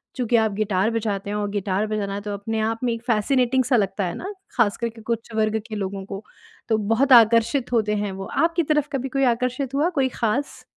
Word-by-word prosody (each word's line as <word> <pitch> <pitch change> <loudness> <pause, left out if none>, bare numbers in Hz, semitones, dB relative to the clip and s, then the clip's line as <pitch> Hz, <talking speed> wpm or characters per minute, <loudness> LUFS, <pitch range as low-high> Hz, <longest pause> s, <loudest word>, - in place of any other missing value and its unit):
चूँकि 245 -2 0
आप 220 -1 +2
गिटार 200 -1 +1
बजाते 205 -3 -2
हैं 205 - -2
और 205 -1 -2
गिटार 200 +1 -1
बजाना 210 -2 -2
है 205 - -4
तो 205 0 -5
अपने 220 +2 -3
आप 225 +1 -1
में 240 - +1
एक 230 0 -7
फ़ैसिनेटिंग 250 +3 +2
सा 255 +1 +2
लगता 195 -2 0
है 175 - -3
ना। 390 +3 -6 0.3
ख़ास 215 -3 +3
कर 235 0 -2
के 225 0 -14
कुछ 230 +1 -4
वर्ग 220 0 +1
के 215 - -6
लोगों 195 -1 -4
को 195 +1 -7 0.5
तो 220 - +3
बहुत 225 +6 +1
आकर्षित 235 +3 +5
होते 210 -2 +2
हैं 205 -1 -2
वो। 195 0 -6 0.2
आपकी 340 0 0
तरफ़ 300 -1 +1
कभी 265 0 -2
कोई 275 +1 0
आकर्षित 250 +2 -1
हुआ 300 +5 +2
कोई 260 -1 +2
ख़ास? 240 +5 -2
225 Hz, 230 wpm, -23 LUFS, 205-250 Hz, 0.5 s, आकर्षित